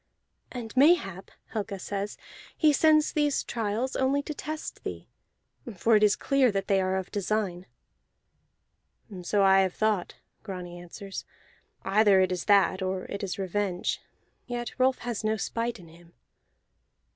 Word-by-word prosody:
"And 240 -2 -7
mayhap," 260 - +3 0.2
Helga 205 -2 -4
says, 200 +2 -4 0.4
"he 305 -2 +4
sends 310 +1 +4
these 295 -2 +1
trials 230 +3 -2
only 275 +2 +1
to 305 - -5
test 305 +2 -6
thee, - - -6 0.7
for 225 +5 +4
it 210 - +4
is 210 -1 +5
clear 275 -3 +2
that 195 -1 -2
they 195 -1 +3
are 185 0 0
of 190 -1 -3
design." 200 -3 -2 1.5
"So 200 +3 +1
I 195 0 +6
have 190 -2 +1
thought," 215 -4 0 0.3
Grani 180 -4 -7
answers. 195 +3 -8 0.6
"Either 200 0 +4
it 185 0 +2
is 180 -2 -3
that, 200 -2 +4
or 185 0 -2
it 200 - -4
is 195 -2 -3
revenge; 195 -1 -2 0.5
yet 240 -1 -4
Rolf 255 0 +3
has 235 -3 -3
no 215 0 +1
spite 230 +3 -2
in 170 -3 -14
him." 170 +1 -18
205 Hz, 145 wpm, -28 LUFS, 190-240 Hz, 1.5 s, I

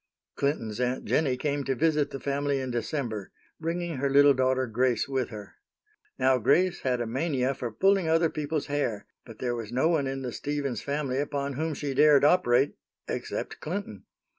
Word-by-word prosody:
Clinton's 120 -6 -1
Aunt 125 +1 -1
Jennie 135 -5 +1
came 145 +1 -1
to 135 - 0
visit 150 +1 +2
the 135 - -6
family 140 0 -1
in 130 -1 -3
December, 120 - -3 0.3
bringing 165 -1 -3
her 140 +1 0
little 140 +1 +6
daughter 130 0 +1
Grace 125 +1 +1
with 130 -3 -1
her. 105 -3 -10 0.6
Now 130 0 +3
Grace 175 - +3
had 125 -2 0
a - - -1
mania 130 +1 0
for 125 -3 -5
pulling 190 - +2
other 165 0 +3
people's 150 0 -2
hair, 140 -8 -2 0.2
but 115 -2 -11
there 125 -1 -2
was 115 -2 -5
no 130 +6 +2
one 155 -5 +1
in 135 0 -4
the 125 - -3
Stevens 140 -3 -3
family 140 -2 -2
upon 140 -1 -2
whom 155 +3 -2
she 140 -1 -3
dared 145 +1 +5
operate 145 -5 +4 0.3
except - - -4
Clinton. 160 - -5
140 Hz, 180 wpm, -27 LUFS, 125-150 Hz, 0.6 s, little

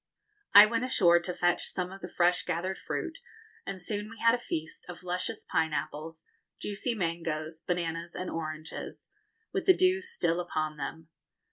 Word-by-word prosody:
I 205 +1 +13
went 230 +2 0
ashore 180 -9 +5
to 175 +1 -4
fetch 175 0 +1
some 180 0 -2
of 195 0 -10
the - - -5
fresh 175 +1 +3
gathered 180 +2 -2
fruit, 325 -1 -4 0.5
and 190 - -4
soon 205 +3 -3
we 225 - -11
had 230 0 +5
a 245 - +1
feast 160 -9 -4
of 180 0 -8
luscious 185 +4 -2
pineapples, 160 0 -2 0.3
juicy 215 +4 -2
mangoes, 165 -3 -2
bananas, 170 -1 -2
and 180 - -4
oranges, 155 -1 -6 0.4
with 390 -3 -2
the 375 - +7
dew 370 +1 +4
still 175 - 0
upon 155 -3 -2
them. 155 +3 -6
175 Hz, 160 wpm, -30 LUFS, 160-205 Hz, 0.5 s, I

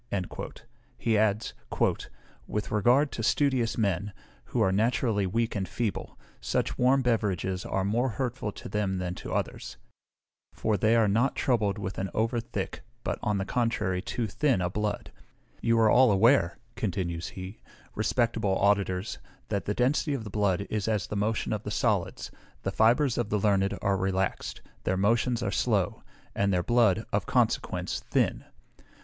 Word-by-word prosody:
He 115 - +1
adds, 105 0 +1 0.9
"with 105 -1 -3
regard 125 +8 +3
to - - -4
studious 130 -1 +1
men, 100 -2 0 0.3
who - - -3
are 95 - +3
naturally 110 -1 +1
weak 115 +5 -1
and 95 -2 -2
feeble, 115 -5 -3 0.2
such - - -1
warm 130 +2 +3
beverages 95 -6 0
are 95 0 -1
more 120 +6 +1
hurtful 125 -2 -3
to - - -9
them 95 -2 -1
than 90 -1 -2
to - - -8
others; - - -3 0.8
for 110 - 0
they 110 +4 +3
are 115 -2 +4
not 115 +7 +2
troubled 110 -6 +1
with 100 -1 -4
an 95 0 -2
over 115 +2 +1
thick, - - -5 0.2
but, - - -2
on 105 -1 0
the 95 - -1
contrary, 115 -6 0
too 115 +3 -2
thin 130 +2 +1
a 90 0 -1
blood. 105 +1 -2 0.5
You 115 0 +2
are 110 -1 +5
all 125 -2 +6
aware," 100 -2 +4 0.2
continues 85 -4 -2
he, 95 +3 -7 0.3
"respectable 115 -5 +1
auditors, 100 -1 +1 0.3
that 100 -4 -1
the 105 - -1
density 140 +3 +1
of 125 - -4
the 105 - -8
blood 100 -2 +1
is 105 -1 -1
as 105 -4 0
the - - -5
motion 105 +2 0
of 105 - -2
the - - -5
solids; - - -1 0.3
the 95 - -1
fibres 120 +6 +3
of 120 - -1
the 105 - +1
learned 100 -1 +2
are 100 -1 +2
relaxed, 95 0 -2 0.2
their 95 - 0
motions 115 +4 +2
are - - -1
slow, 100 -7 0 0.3
and 100 0 +1
their 90 -2 +1
blood, 110 -1 +3
of - - 0
consequence, - - 0
thin. - - +1
105 Hz, 165 wpm, -28 LUFS, 95-115 Hz, 0.9 s, all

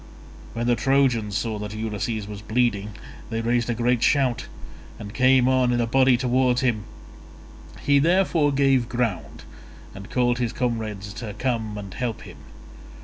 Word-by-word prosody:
When 120 0 -3
the 120 0 +3
Trojans 120 -7 +1
saw 110 -3 -3
that 105 0 -6
Ulysses 110 0 -3
was 105 0 -8
bleeding 105 -2 0 0.4
they 115 -1 -2
raised 120 +1 0
a 120 - 0
great 120 0 +1
shout 130 -4 +1 0.5
and 100 0 -9
came 130 +1 +4
on 130 -1 +3
in 120 - +1
a 120 - +2
body 130 +1 +4
towards 125 0 +1
him; 115 -5 0 1.0
he 140 0 +3
therefore 165 -2 +2
gave 135 -3 +2
ground, 90 - -3 0.5
and 100 +2 -10
called 120 -1 +1
his 120 -2 -1
comrades 110 -5 -3
to 110 -3 -7
come 110 -3 -2
and 100 -3 -8
help 120 -4 -4
him. - - -12
120 Hz, 155 wpm, -24 LUFS, 105-130 Hz, 1.0 s, came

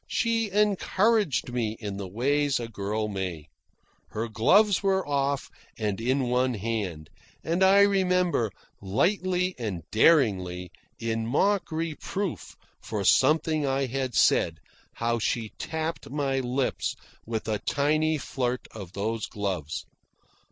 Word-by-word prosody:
She 230 -2 0
encouraged 205 - +2
me 110 -3 -1
in 100 -3 -5
the 100 -1 -5
ways 140 +7 +1
a 120 - -4
girl 105 0 -2
may. 90 -7 -4 0.6
Her 110 +2 -3
gloves 190 - +4
were 190 -3 +1
off 140 -1 -1 0.3
and 105 -1 -2
in 130 +2 +1
one 125 0 +2
hand, 100 -8 -3 0.3
and 170 +3 -1
I 195 +1 +6
remember, 180 - +2 0.3
lightly 180 - +1
and 100 -8 -4
daringly, 95 - +3 0.3
in 115 0 -2
mock 195 - +1
reproof 165 +4 -4 0.3
for 105 -3 -3
something 155 - +3
I 135 0 +1
had 130 -1 -3
said, - - +3 0.4
how 115 0 -1
she 110 0 -1
tapped 160 +1 -4
my 135 -1 0
lips 130 +1 -1 0.3
with 110 -1 -3
a 105 -2 0
tiny 155 +5 +1
flirt 125 -3 -3
of 100 -4 -9
those 110 +3 -2
gloves. 95 -7 -3
130 Hz, 125 wpm, -27 LUFS, 110-165 Hz, 0.6 s, I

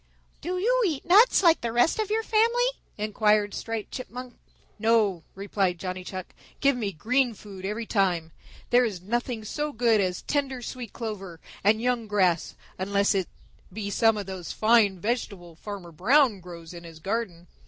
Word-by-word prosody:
"Do 360 +3 -3
you - - +2
eat 300 -6 -3
nuts 405 +4 +6
like 335 -2 +5
the 235 - -2
rest 240 - +2
of 430 -2 -1
our 445 +1 0
family?" 460 +3 +3 0.3
inquired 210 -1 +2
Striped 225 -2 -4
Chipmunk. 250 0 -7 0.5
"No," 215 -5 +2
replied 195 -2 -1
Johnny 185 +1 -5
Chuck. 185 0 -7 0.3
"Give 280 -1 +3
me 215 -5 -2
green 240 - +1
food 195 -2 -10
every 220 +3 -3
time. 180 -7 0 0.4
There 245 +1 +6
is 210 -7 -2
nothing 235 +1 -2
so 295 +7 -3
good 230 -4 +3
as 180 -2 -2
tender 270 -4 -2
sweet 245 -2 -6
clover 195 -7 -6 0.2
and 210 +2 +4
young 240 -1 0
grass, 185 -5 +1 0.2
unless 200 +1 +2
it 190 -3 0 0.4
be 205 +1 -5
some 225 +1 +3
of 205 - -4
those 185 -2 -6
fine 215 -4 +3
vegetables 190 -6 -4
Farmer 200 -5 -7
Brown 225 - +3
grows 170 -2 -10
in 170 0 -9
his 165 -1 -11
garden." 190 -1 -3
215 Hz, 165 wpm, -26 LUFS, 190-245 Hz, 0.5 s, nuts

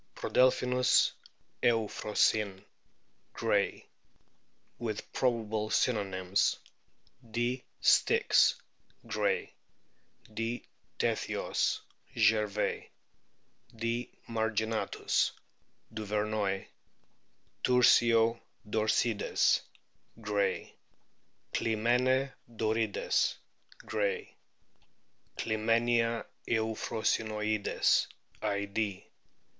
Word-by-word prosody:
Prodelphinus 125 0 +3 0.5
euphrosyne, 105 -3 +1 0.7
Gray - - 0 0.4
\ - - -42
(with 110 -2 -5
probable 110 -4 0
synonyms: 95 -6 +1 0.7
D. 120 +3 -1 0.2
styx, - - +4 0.5
Gray; - - -1 0.8
D. 115 +2 -3 0.3
tethyos, - - 0 0.4
Gervais; 105 -1 +1 0.9
D. 115 +2 -2 0.2
marginatus, 110 -1 0 0.6
Duvernoy; 105 -2 -1 1.0
Tursio 115 -2 +5 0.3
dorcides, 110 +1 +2 0.6
Gray; 105 -2 -1 0.8
Clymene 125 +4 +1 0.2
dorides, 110 -1 +1 0.5
Gray; 105 -2 -2 1.0
Clymenia 115 +1 +1 0.2
euphrosynoides, 110 -1 0 0.3
Id.) 100 0 -2
110 Hz, 50 wpm, -31 LUFS, 105-115 Hz, 1.0 s, Tursio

